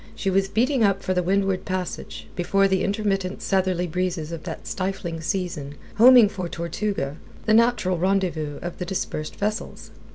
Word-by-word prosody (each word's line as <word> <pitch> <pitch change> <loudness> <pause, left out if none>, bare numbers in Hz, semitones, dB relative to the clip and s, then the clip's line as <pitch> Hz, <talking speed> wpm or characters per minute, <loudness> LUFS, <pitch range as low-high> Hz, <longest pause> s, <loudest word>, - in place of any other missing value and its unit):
she 195 - -1
was 195 +1 +2
beating 250 +4 +2
up 195 -1 +2
for 185 - 0
the 180 - +1
Windward 195 +1 +1
Passage, 185 -2 -4
before 195 +2 +2
the 190 -1 +1
intermittent 195 -2 -1
southeasterly 185 -2 +1
breezes 175 -2 -2
of 165 -2 -5
that 160 - -6
stifling 185 -4 -3
season, 165 -5 -3 0.2
homing 245 0 +8
for 185 -4 -5
Tortuga, 170 -4 -3 0.3
the 215 - +3
natural 225 -6 +3
rendezvous 175 -6 0
of 175 0 -6
the 180 - -2
dispersed 175 -4 -3
vessels. 210 +2 -4
185 Hz, 160 wpm, -24 LUFS, 175-200 Hz, 0.3 s, homing